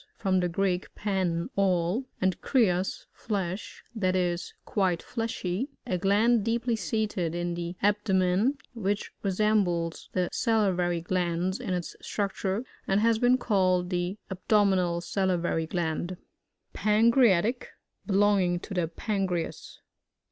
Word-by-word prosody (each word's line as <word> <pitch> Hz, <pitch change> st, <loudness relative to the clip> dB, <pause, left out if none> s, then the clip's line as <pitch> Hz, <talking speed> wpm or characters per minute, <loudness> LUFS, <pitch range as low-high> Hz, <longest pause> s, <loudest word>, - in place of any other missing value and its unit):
— -, -, -46 dB
From 185 Hz, -1 st, +1 dB
the 180 Hz, -1 st, 0 dB
Greek, 185 Hz, +1 st, 0 dB
;wn, 185 Hz, -5 st, -1 dB
all, 190 Hz, +4 st, +1 dB
and 185 Hz, -1 st, 0 dB
kreaa^ 195 Hz, -8 st, +1 dB
flesh, 195 Hz, -2 st, -4 dB
that 185 Hz, -5 st, 0 dB
is, 175 Hz, -1 st, -1 dB
quite 185 Hz, -4 st, 0 dB
fleshy, 225 Hz, 0 st, -3 dB, 0.2 s
A 180 Hz, -, -1 dB
gland 210 Hz, +4 st, +3 dB
deeply 235 Hz, +1 st, 0 dB
seated 200 Hz, -4 st, -1 dB
in 175 Hz, 0 st, -2 dB
the 170 Hz, +1 st, -4 dB
ab 205 Hz, +1 st, +4 dB
domen, 190 Hz, +6 st, +2 dB, 0.2 s
which 205 Hz, -3 st, -2 dB
resembles 190 Hz, -4 st, 0 dB
the 180 Hz, -1 st, +1 dB
sali 220 Hz, -5 st, +2 dB
vary 175 Hz, -1 st, 0 dB
glands 180 Hz, +2 st, -1 dB
in 205 Hz, -7 st, -2 dB
its 175 Hz, -2 st, -5 dB
structure^ 200 Hz, +1 st, -2 dB, 0.2 s
and 195 Hz, +1 st, +3 dB
has 225 Hz, 0 st, +3 dB
been 245 Hz, +1 st, +4 dB
called 185 Hz, -6 st, +1 dB
the 180 Hz, +2 st, -1 dB
abdominal 190 Hz, -3 st, +2 dB
sa/t* 190 Hz, +1 st, 0 dB
vary 165 Hz, -1 st, -1 dB
gland, 175 Hz, +1 st, -2 dB, 0.6 s
Parcreatic. 225 Hz, 0 st, +3 dB, 0.2 s
— -, -, -50 dB
Belonging 195 Hz, -3 st, +3 dB
to 200 Hz, -, -7 dB
the 175 Hz, -3 st, 0 dB
Pan 195 Hz, +3 st, -2 dB
creas. 175 Hz, -3 st, -4 dB
190 Hz, 135 wpm, -28 LUFS, 175-210 Hz, 0.6 s, ab